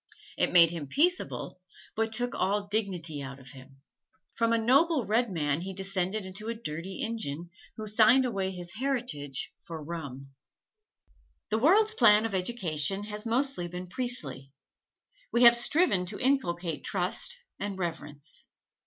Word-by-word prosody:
It - - +1
made 170 -2 +7
him 165 -4 -5
peaceable, 320 - 0 0.3
but 225 0 0
took 245 +2 +1
all 205 +1 0
dignity 185 -8 -2
out 135 0 -7
of 130 -1 -13
him. 135 0 -15 0.5
From 230 0 +1
a 230 - +3
noble 270 +4 +3
red 230 +3 +1
man 150 -4 -1
he 190 +1 -6
descended 195 +1 -1
into 195 +4 -6
a 230 - -2
dirty 180 -2 -5
Injun, 175 -8 -4 0.3
who 215 - -5
signed 220 +5 +5
away 195 -6 -1
his 175 -1 -6
heritage 215 - -3
for 160 -2 -7
rum. 140 -4 -7 1.2
The 220 +1 +1
world's 415 - +4
plan 215 - +5
of 225 - -3
education 185 -3 0
has 210 +1 -5
mostly 250 -5 0
been 180 +1 -6
priestly 175 - -3 0.8
we 235 - +3
have 240 0 +9
striven 235 - +3
to 205 - -4
inculcate 180 - 0
trust 195 - 0 0.2
and 200 -1 -4
reverence. 150 -4 -5
195 Hz, 145 wpm, -29 LUFS, 165-230 Hz, 1.2 s, have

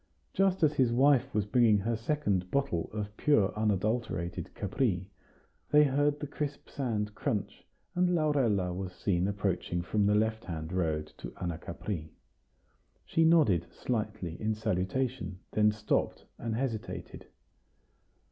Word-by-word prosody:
Just 190 -2 +2
as 150 -1 +5
his 130 -5 +3
wife 135 +2 +4
was 105 -1 0
bringing 115 -1 +4
her 115 +4 -1
second 110 -7 0
bottle 135 -12 0
of 105 -1 -5
pure 110 -10 +3
unadulterated 100 -4 -1
Capri, 95 -3 -1 0.6
they 150 0 +7
heard 145 +1 +2
the - - -3
crisp 145 0 -5
sand 110 -6 -2
crunch, - - -3 0.3
and 180 0 +2
Laurella 120 - +2
was 90 0 -5
seen 90 -1 0
approaching 95 -3 -1
from 100 +2 +1
the 105 - +4
left 110 +1 +1
hand 80 -1 -5
road 80 -4 -1
to - - -6
Anacapri. 85 0 -4 1.0
She 165 - +2
nodded 150 - +4
slightly 105 -8 -3
in 110 0 0
salutation; 110 0 -1
then 105 0 +4
stopped, 105 0 -1
and 115 -1 -2
hesitated. 115 -3 -4
105 Hz, 130 wpm, -30 LUFS, 95-130 Hz, 1.0 s, they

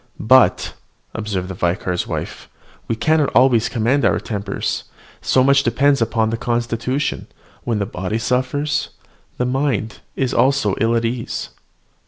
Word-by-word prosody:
"But," 130 +4 +4 0.4
observed 100 -4 -3
the 95 - -5
vicar's 90 0 -1
wife, - - -5 0.4
"we 115 - -1
cannot 155 +4 +2
always 120 -3 +4
command 125 +4 +1
our - - +3
tempers, 100 -2 -3 0.4
so 130 - +3
much 140 +1 +5
depends 140 -1 +2
upon 110 -1 +1
the 115 - -1
constitution: 120 +3 -2 0.4
when 115 -3 0
the 100 - -1
body 95 0 -3
suffers, 130 +6 -1 0.5
the 125 - 0
mind 125 -4 -1 0.2
is 130 -2 -1
ill 115 -4 +2
at 115 0 +1
ease." 115 0 -3
120 Hz, 135 wpm, -20 LUFS, 110-130 Hz, 0.5 s, much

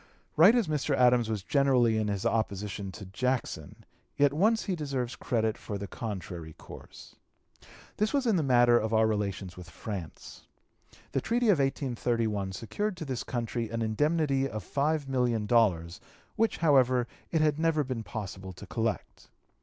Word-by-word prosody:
Right 190 +9 +7
as 235 -7 +2
Mr. 150 -2 0
Adams 125 -3 +4
was 105 -3 -2
generally 125 -3 +3
in 110 - -1
his 100 -2 -2
opposition 100 -3 -2
to 100 - -9
Jackson, 125 +7 -3 0.3
yet 145 -1 +4
once 215 +8 +2
he 190 - -2
deserves 135 -6 -3
credit 110 -3 -1
for 105 - -5
the 100 - -5
contrary 90 -7 -6
course. - - -13 0.8
This 215 +1 +1
was 280 -2 +1
in 225 -4 +3
the 170 - +2
matter 120 -3 +5
of 110 +1 -1
our 110 0 +4
relations 100 -4 -2
with 90 -2 -10
France. 95 +1 -8 0.6
The - - 0
treaty 235 0 +1
of 185 -7 +4
1831 115 -7 -1
secured 180 - -3
to 160 - -5
this 130 -4 -3
country 120 -2 -3
an 115 0 -2
indemnity 140 +4 +1
of 110 -4 -5
$5,000,000, 120 - +1 0.4
which, 225 0 +1
however, 130 -6 +3 0.2
it 160 - +1
had 150 -1 +2
never 160 -2 +2
been 130 -4 -4
possible 95 -4 -7
to 100 - -11
collect. 110 -2 -3
120 Hz, 155 wpm, -29 LUFS, 105-145 Hz, 0.8 s, Right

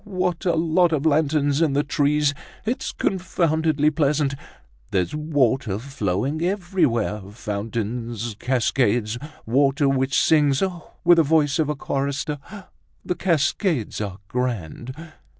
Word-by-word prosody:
what 185 -3 -2
a 175 -2 +2
lot 165 +2 +3
of 155 -1 0
lanterns 145 -1 +2
in 155 -4 +2
the 145 +1 +2
trees! 145 0 +2 0.3
It's 240 +4 -2
confoundedly 160 -5 +1
pleasant! 145 -2 +1 0.6
There's 90 -3 0
water 135 -8 +1
flowing 130 - -2
everywhere, 170 - 0
fountains, 115 +1 -4
cascades, 120 -3 +1 0.3
water 140 +4 +2
which 135 0 +2
sings, 145 -1 +3
oh! 180 -3 -4
with 175 0 +6
the 165 - +6
voice 150 0 +2
of 155 -2 +1
a 150 - 0
chorister. 140 +2 -2 0.7
The - - 0
cascades 165 - 0
are 100 -3 -4
grand!" 120 - -3
145 Hz, 120 wpm, -23 LUFS, 120-160 Hz, 0.7 s, with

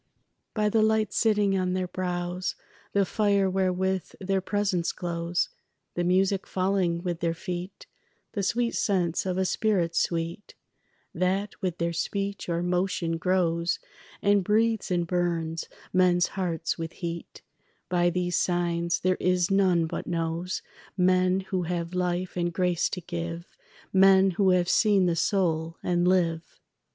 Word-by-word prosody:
By 210 -1 +2
the 220 +1 +3
light 215 -1 +2
sitting 210 -3 +2
on 185 -1 0
their 185 0 0
brows, 180 0 -3 0.4
The 200 -1 +2
fire 200 -1 +2
wherewith 190 -1 0
their 195 0 0
presence 195 -3 0
glows, 170 0 -2 0.4
The 175 - -1
music 190 +2 +2
falling 185 -2 0
with 175 -2 -2
their 170 -1 0
feet, 180 +2 -6 0.5
The 205 - -2
sweet 235 +4 0
sense 180 -3 0
of 185 0 -1
a 190 - +1
spirit 180 -4 +1
sweet 170 +4 -2 0.6
That 190 +3 0
with 180 -3 -2
their 170 0 -1
speech 200 +3 -3
or 170 0 0
motion 175 -2 0
grows 170 -1 +1 0.5
And 200 -1 +4
breathes 220 +2 +1
and 175 -2 +1
burns 165 -2 -1 0.2
men's 180 -1 +4
hearts 170 -4 -2
with 165 0 -4
heat; 170 -1 -6 0.4
By 175 -1 +2
these 180 0 -1
signs 170 -1 0
there 185 0 +2
is 180 0 +1
none 185 -4 +3
but 160 - -5
knows 170 +1 -2 0.3
Men 185 +1 +3
who 190 -1 -2
have 170 0 -3
life 180 0 -1
and 175 -1 0
grace 175 -1 +1
to 180 - -4
give, 170 0 -6 0.4
Men 190 0 +6
who 190 +2 +2
have 180 -1 +3
seen 200 +1 +4
the 170 -1 +1
soul 165 -3 0
and 175 0 +1
live. 170 -3 0
180 Hz, 145 wpm, -27 LUFS, 170-190 Hz, 0.6 s, Men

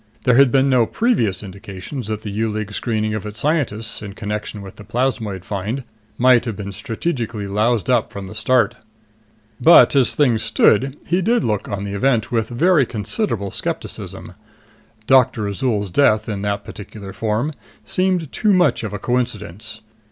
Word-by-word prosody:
There 125 - +4
had 135 -2 +6
been 135 0 +3
no 125 -4 +3
previous 115 - 0
indications 100 +5 -7
that 110 0 -4
the 105 - -5
U 110 +2 -1
League's 105 0 -4
screening 110 -2 -1
of 110 - -3
its 105 +1 -7
scientists, 115 -8 -1
in 100 -2 -7
connection 105 0 -5
with 95 - -11
the 105 - -10
plasmoid 110 -4 -2
find, 105 +7 -3 0.3
might 125 -1 +5
have 115 -4 -3
been 100 -1 -6
strategically 115 - -3
loused 105 +2 0
up 125 -3 +2
from 100 -1 -7
the 95 - -9
start. 125 +4 +2 0.8
But 165 -2 +7
as 130 -4 +4
things 125 -7 +2
stood, 130 +5 +2
he 180 +2 +1
did 230 +4 +2
look 105 -2 -1
on 100 -1 -3
the 100 0 -4
event 115 +1 +1
with 115 -2 0
very 150 +2 +3
considerable 110 - -2
skepticism. 85 - -4 0.7
Doctor 130 -4 +3
Azol's 100 -2 -1
death, 110 -3 +3
in 105 -3 -3
that 100 0 -2
particular 100 -1 -9
form, 115 +7 -1 0.3
seemed 185 -5 0
too 210 -2 +2
much 175 -11 +3
of 105 -2 -4
a - - -2
coincidence. 110 -3 -3
110 Hz, 165 wpm, -20 LUFS, 105-130 Hz, 0.8 s, But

